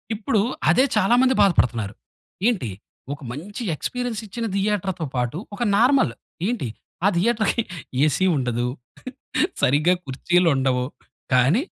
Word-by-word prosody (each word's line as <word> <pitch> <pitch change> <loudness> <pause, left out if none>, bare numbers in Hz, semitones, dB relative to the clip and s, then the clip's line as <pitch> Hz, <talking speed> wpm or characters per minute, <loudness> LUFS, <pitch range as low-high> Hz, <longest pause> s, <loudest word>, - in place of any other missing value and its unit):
ఇప్పుడు 210 0 0 0.3
అదే 255 - +5
చాలా 215 +6 +4
మంది 260 0 +4
బాధపడుతున్నారు. 120 - +2 0.5
ఏంటి 190 - 0 0.4
ఒక 145 - -10
మంచి 200 - -6
ఎక్స్‌పీరియన్స్ 245 - -3
ఇచ్చిన 230 +4 -4
థియేటర్‌తో 195 -4 -1
పాటు 125 +4 -1 0.2
ఒక 240 - -2
నార్మల్ 240 - +4 0.3
ఏంటి 230 - -1 0.4
ఆ - - +6
థియేటర్‌కి 225 +3 +2 0.4
ఏసీ 155 +5 +2
ఉండదు, 120 -1 -1 1.0
సరిగ్గా 150 +7 +4
కుర్చీలు 175 +7 +1
ఉండవు 130 -1 +1 0.5
కానీ 135 - +4
180 Hz, 115 wpm, -23 LUFS, -, 1.0 s, ఆ